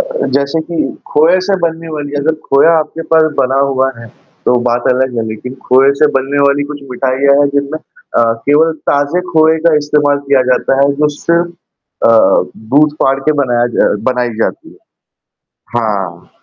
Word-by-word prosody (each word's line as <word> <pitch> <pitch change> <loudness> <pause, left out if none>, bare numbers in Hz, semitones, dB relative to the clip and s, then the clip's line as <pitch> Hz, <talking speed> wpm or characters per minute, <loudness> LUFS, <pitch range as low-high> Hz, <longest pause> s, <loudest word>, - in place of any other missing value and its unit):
अ, - - +3 0.3
जैसे 140 +3 -1
कि 170 - -5 0.3
खोए 165 +5 +3
से 195 - +2
बनने 165 0 -3
वाली 145 -1 -6
अगर 155 +2 0
खोया 140 +4 +4
आपके 160 +1 -4
पास 160 0 +5 0.2
बना 135 0 +1
हुआ 135 -1 +1
है, 115 - -10 0.4
तो - - +3
बात 120 0 0
अलग 130 -1 -1
है 115 - -1
लेकिन 120 +4 -7
खोए 135 +2 +4
से 150 - +6
बनने 135 +2 -2
वाली 140 +1 +1
कुछ 145 - -9
मिठाइयाँ 135 +2 +1
हैं 145 - +3
जिनमें 140 +2 -2
अ, - - -4 0.3
केवल 160 +3 +3 0.2
ताज़े 145 +5 0
खोए 160 0 +4
का 165 - +4
इस्तेमाल 145 -1 +1
किया 135 -2 +3
जाता 125 +1 +1
है, 140 0 +3
जो 150 +1 +2
सिर्फ़ 170 +1 0 0.6
अ, - - +5 0.6
दूध 150 +1 +4
फाड़ 135 0 +2
के - - +4
बनाया 120 -2 +1
ज - - +2 0.2
बनाई 125 -1 -1
जाती - - -4
है। - - -18 1.0
हाँ। 100 -7 -3
140 Hz, 175 wpm, -13 LUFS, 130-155 Hz, 1.0 s, से